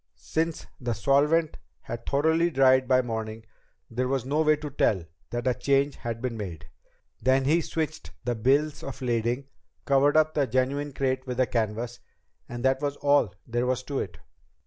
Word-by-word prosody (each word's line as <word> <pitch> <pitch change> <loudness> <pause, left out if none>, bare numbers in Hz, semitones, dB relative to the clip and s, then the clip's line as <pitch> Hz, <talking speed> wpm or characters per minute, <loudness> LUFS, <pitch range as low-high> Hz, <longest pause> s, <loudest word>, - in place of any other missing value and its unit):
Since 160 0 -2
the 120 -2 -1
solvent 150 +6 +2 0.2
had 115 0 -7
thoroughly 160 +4 +3
dried 130 -3 +4
by 130 0 +4
morning, 110 -1 -4 0.4
there 125 +2 -2
was 130 -2 -1
no 145 +4 +1
way 155 -1 +4
to 150 -1 -7
tell 95 - +1 0.2
that 120 0 -3
a 130 - +3
change 140 +2 +1
had 115 0 -5
been 125 -2 -2
made. 90 -8 -6 0.5
Then 130 +1 +3
he 160 +5 +3
switched 160 -1 -3 0.2
the 120 - +1
bills 140 +6 +1
of 135 -1 -7
lading, 120 +2 0 0.4
covered 140 +2 +4
up 155 0 +4
the 140 -3 +1
genuine 140 +3 0
crate 130 -1 -1
with 125 -1 -3
the 130 - +4
canvas 115 +1 -2 0.5
and 120 +1 -4
that 130 +1 +2
was 145 -1 -1
all 140 -11 +2
there 120 +1 -1
was 130 0 0
to 140 0 -3
it. - - -5
130 Hz, 175 wpm, -27 LUFS, 120-145 Hz, 0.5 s, dried